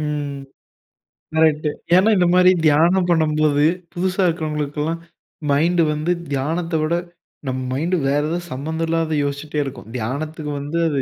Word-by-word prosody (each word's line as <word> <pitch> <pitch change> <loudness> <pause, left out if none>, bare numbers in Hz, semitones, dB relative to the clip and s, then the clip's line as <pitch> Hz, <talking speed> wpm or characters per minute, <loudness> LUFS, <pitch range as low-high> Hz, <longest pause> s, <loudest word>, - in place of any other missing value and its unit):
ம். 145 -2 -3 1.0
கரெக்ட்டு. 155 -1 +3 0.3
ஏன்னா, 195 +4 +5
இந்த 180 - +3
மாரி 180 0 +6 0.2
தியானம் 175 +5 +4
பண்ணும்போது, 155 -2 +3 0.3
புதுசா 185 +1 0
இருக்கிறவங்களுக்குலாம் 155 -1 -2 0.5
மைண்டு 170 +4 +3
வந்து 155 +3 -1 0.2
தியானத்த 165 +5 -1
விட, 155 +2 0 0.5
நம்ம 130 0 -2
மைண்டு 170 +7 0
வேற 145 +1 +2
ஏதோ, 175 - -1
சம்மந்தம் 160 +5 -3
இல்லாதத 160 -2 0
யோசிச்சுட்டே 145 +1 -3
இருக்கும். 130 -4 -8
தியானத்துக்கு 150 +6 -4
வந்து 145 +4 -4
அது 140 -3 0
155 Hz, 130 wpm, -21 LUFS, 145-170 Hz, 1.0 s, மாரி